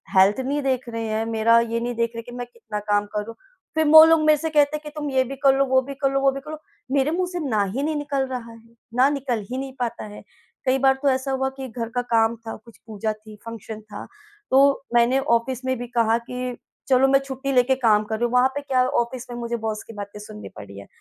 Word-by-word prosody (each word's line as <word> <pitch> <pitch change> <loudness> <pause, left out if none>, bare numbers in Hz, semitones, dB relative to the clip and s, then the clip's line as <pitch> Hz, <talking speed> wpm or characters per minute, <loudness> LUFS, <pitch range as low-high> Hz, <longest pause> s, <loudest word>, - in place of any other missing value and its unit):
Health 195 +5 +5
नहीं 280 +3 -1
देख 255 -2 -1
रहे 230 0 -4
हैं, 220 +1 -1
मेरा 230 +1 +4
ये 230 0 -1
नहीं 240 0 -3
देख 230 0 0
रहे - - -4
हैं 230 - -7
कि 245 - -9
मैं 245 - -4
कितना 220 -2 -6
काम 205 0 +3
करूँ। 210 +2 -4 0.4
फिर 315 -1 +2
वो 315 +1 +10
लोग 325 -1 +4
मेरे 305 -1 +5
से 320 +2 -3
कहते 300 0 +3
हैं - - -13
कि 300 - -7
तुम 295 -1 -3
ये 260 -1 +3
भी 270 +2 -7
कर 270 -1 +6
लो, 275 - +3
वो 260 0 +3
भी 275 +2 -7
कर 275 -1 +2
लो, 275 - +1
वो 275 0 +4
भी 275 - -5
कर 300 +2 -9
लो। 310 - -5 0.3
मेरे 280 +2 +2
मुँह 360 +1 0
से 355 - -3
ना 215 -3 +2
ही 220 +9 -3
नहीं 310 0 -1
निकल 285 -2 -1
रहा 245 -3 -6
है। - - -13 0.4
ना 260 +3 +5
निकल 255 -7 -2
ही 255 - -3
नहीं 270 0 -5
पाता 240 -2 -3
है। 210 0 -11 0.4
कई 260 +1 +3
बार 270 0 +5
तो 280 - +3
ऐसा 265 +1 0
हुआ 265 0 0
कि 265 -1 -5
घर 230 0 -5
का 245 - +2
काम 230 -1 +2
था, 225 -1 -8
कुछ 230 -2 -16
पूजा 215 0 -2
थी, 215 0 -14
फ़ंक्शन 220 -1 -8
था, 210 -1 -10 0.4
तो 275 +1 +4
मैंने 240 +3 +4
ऑफिस 260 -1 0
में 260 -1 0
भी 245 0 -6
कहा 230 -1 +2
कि 250 +1 -5 0.3
चलो 265 0 +4
मैं 275 0 +4
छुट्टी 275 0 -4
लेकर 255 0 +3
काम 215 -2 +4
कर 220 - -3
रही 240 - -1
हूँ। 240 - -2
वहाँ 250 +1 +5
पे 285 - -2
क्या 260 -2 +1
ऑफिस 250 -1 -2
में 240 - -6
मुझे 235 0 -3
बॉस 220 -1 -4
की 225 - -12
बातें 205 0 -8
सुननी 210 0 -10
पड़ 100 - -9
रही 100 0 -11
हैं। 100 - -12
250 Hz, 270 wpm, -23 LUFS, 225-270 Hz, 0.4 s, वो